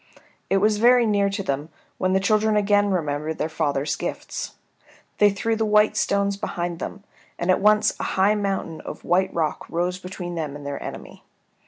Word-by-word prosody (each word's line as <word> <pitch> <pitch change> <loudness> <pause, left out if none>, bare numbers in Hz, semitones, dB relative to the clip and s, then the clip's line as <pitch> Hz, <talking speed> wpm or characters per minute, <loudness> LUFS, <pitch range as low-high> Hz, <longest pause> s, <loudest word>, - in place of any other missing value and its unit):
It 195 - +3
was 210 +2 +3
very 240 +1 +5
near 200 -2 +2
to 195 0 -3
them, 145 0 -2 0.3
when 185 0 +1
the 190 - +4
children 215 +2 +2
again 205 0 +3
remembered 155 -3 -1
their - - -1
father's 150 -3 -1
gifts. - - -5 0.6
They 205 - +7
threw 215 +3 -1
the 220 - 0
white 210 0 +4
stones 200 0 +1
behind 175 -3 -3
them, 200 - -6 0.3
and 175 +2 +1
at - - +2
once 210 +1 +4
a - - -2
high 195 +2 +4
mountain 195 -5 -2
of - - -8
white 185 +2 +2
rock 160 -3 -2
rose 180 +2 -1
between 180 -1 -6
them 155 -4 -4
and 145 -1 -9
their 140 0 -4
enemy. - - -8
190 Hz, 185 wpm, -23 LUFS, 165-210 Hz, 0.6 s, They